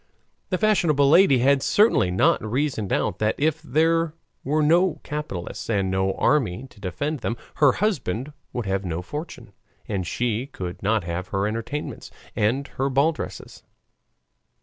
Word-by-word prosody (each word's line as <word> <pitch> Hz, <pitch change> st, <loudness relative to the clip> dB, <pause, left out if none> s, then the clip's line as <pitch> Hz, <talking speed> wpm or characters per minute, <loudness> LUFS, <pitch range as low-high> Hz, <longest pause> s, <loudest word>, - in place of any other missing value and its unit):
The 185 Hz, -, 0 dB
fashionable 170 Hz, -9 st, +3 dB
lady 170 Hz, -5 st, +6 dB
had 135 Hz, +2 st, +3 dB
certainly 145 Hz, -, +3 dB
not 90 Hz, +3 st, +2 dB
reasoned 115 Hz, -2 st, -1 dB
out 90 Hz, -, 0 dB
that 110 Hz, 0 st, +1 dB
if 160 Hz, +2 st, 0 dB
there 165 Hz, +2 st, +1 dB, 0.3 s
were 150 Hz, +3 st, +1 dB
no 170 Hz, +3 st, +3 dB
capitalists 150 Hz, -, -5 dB
and 100 Hz, -4 st, +1 dB
no 95 Hz, 0 st, +1 dB
army 120 Hz, -5 st, +1 dB
to 105 Hz, -, -18 dB
defend 140 Hz, -, -3 dB
them, 115 Hz, 0 st, -3 dB, 0.2 s
her 145 Hz, -4 st, +5 dB
husband 145 Hz, -, -1 dB, 0.2 s
would 120 Hz, -3 st, -3 dB
have 95 Hz, 0 st, -1 dB
no 85 Hz, -1 st, -3 dB
fortune, 150 Hz, -, -7 dB, 0.3 s
and 95 Hz, -4 st, -2 dB
she 120 Hz, +4 st, -1 dB
could 90 Hz, -9 st, -7 dB
not 105 Hz, 0 st, +1 dB
have 85 Hz, +2 st, -4 dB
her 95 Hz, 0 st, -1 dB
entertainments 115 Hz, +7 st, -4 dB, 0.3 s
and 125 Hz, +7 st, +1 dB
her 135 Hz, +1 st, -2 dB
ball 140 Hz, +4 st, +3 dB
dresses. 155 Hz, -, -8 dB
130 Hz, 150 wpm, -24 LUFS, 100-150 Hz, 0.3 s, lady